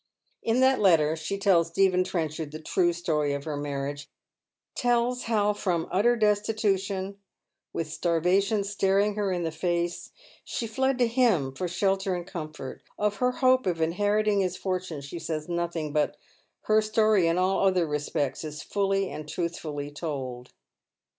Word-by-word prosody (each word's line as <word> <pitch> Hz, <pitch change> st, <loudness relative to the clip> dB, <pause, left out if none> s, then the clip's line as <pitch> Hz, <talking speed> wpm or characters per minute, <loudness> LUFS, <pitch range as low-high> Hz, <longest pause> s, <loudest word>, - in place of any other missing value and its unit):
In 230 Hz, +3 st, +1 dB
that 260 Hz, 0 st, +4 dB
letter 160 Hz, -6 st, +4 dB
she 160 Hz, +5 st, -4 dB
tells 190 Hz, -4 st, +3 dB
Stephen 185 Hz, +1 st, +3 dB
Trenchard 160 Hz, -4 st, -3 dB
the 155 Hz, +1 st, -8 dB
true 175 Hz, +2 st, +1 dB
story 155 Hz, -4 st, 0 dB
of 140 Hz, 0 st, -4 dB
her 155 Hz, -1 st, -4 dB
mamage 145 Hz, 0 st, -4 dB, 0.3 s
— -, -, -64 dB, 0.3 s
tells 245 Hz, 0 st, +1 dB
how 210 Hz, -2 st, +2 dB
from 180 Hz, -5 st, -1 dB
utter 220 Hz, +6 st, +3 dB
destitution, 200 Hz, -3 st, 0 dB, 0.5 s
with 165 Hz, -, -3 dB
stai 165 Hz, +2 st, 0 dB
vation 195 Hz, +4 st, +2 dB
staring 200 Hz, +1 st, +2 dB
her 205 Hz, -2 st, -1 dB
in 175 Hz, -1 st, -1 dB
the 165 Hz, -, -1 dB
face 175 Hz, +1 st, -2 dB, 0.3 s
she 235 Hz, -, -3 dB
fled 265 Hz, +4 st, 0 dB
to 245 Hz, -, +4 dB
him 225 Hz, -, +2 dB
for 180 Hz, +7 st, -3 dB
shelter 190 Hz, +1 st, 0 dB
and 175 Hz, -1 st, -5 dB
comfort 155 Hz, -6 st, -7 dB, 0.2 s
Of 210 Hz, -1 st, 0 dB
her 250 Hz, +4 st, +2 dB
hope 255 Hz, -3 st, +3 dB
of 170 Hz, -2 st, 0 dB
inheriting 205 Hz, +5 st, +2 dB
his 185 Hz, -1 st, 0 dB
fortune 185 Hz, -5 st, -3 dB
she 140 Hz, +5 st, -7 dB
says 155 Hz, -1 st, -4 dB
nothing, 170 Hz, -3 st, -2 dB
but 150 Hz, -1 st, +1 dB, 0.4 s
her 215 Hz, 0 st, +3 dB
story 215 Hz, -4 st, +3 dB
in 165 Hz, +1 st, +2 dB
all 190 Hz, +1 st, +2 dB
other 185 Hz, -2 st, +2 dB
respects 145 Hz, -2 st, -2 dB
is 150 Hz, -1 st, -6 dB
fully 195 Hz, -1 st, 0 dB
and 150 Hz, 0 st, -7 dB
truthfully 155 Hz, -4 st, -4 dB
told. 135 Hz, -5 st, -5 dB
180 Hz, 160 wpm, -27 LUFS, 160-205 Hz, 0.5 s, that